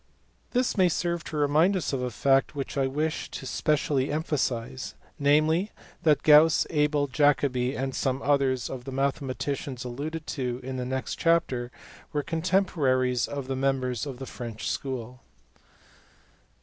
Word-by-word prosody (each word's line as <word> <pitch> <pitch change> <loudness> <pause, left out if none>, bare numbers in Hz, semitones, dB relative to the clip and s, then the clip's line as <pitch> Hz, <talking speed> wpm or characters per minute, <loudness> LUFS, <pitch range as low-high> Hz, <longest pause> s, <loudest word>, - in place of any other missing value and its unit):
This 250 0 +1
may 185 -2 +5
serve 170 0 -1
to 155 - -5
remind 155 +7 +3
us 170 - -2
of 135 - -1
a 125 - -1
fact 135 +4 +2
which 140 -1 -4
I 135 -1 +2
wish 150 +4 -2
to - - -7
specially 140 +1 0
emphasize, 135 - -2 0.2
namely, 155 +7 +3 0.3
that 155 -2 +3
Gauss, 155 +1 +6
Abel, 150 -2 +2
Jacobi, 135 -2 +2
and 135 0 -2
some 130 0 -1
others 135 -4 +2
of 125 -2 -7
the 135 - -5
mathematicians 135 -1 -2
alluded 150 +6 -5
to 125 -3 -3
in 130 0 -4
the 125 - -3
next 130 0 -3
chapter 160 -8 +1 0.4
were 145 -1 0
contemporaries 155 -8 +1
of 140 -2 -5
the 135 - -2
members 130 -1 0
of 135 -3 -6
the 135 - -6
French 115 -3 -5
school. 125 -2 -5
140 Hz, 150 wpm, -27 LUFS, 130-150 Hz, 0.4 s, Gauss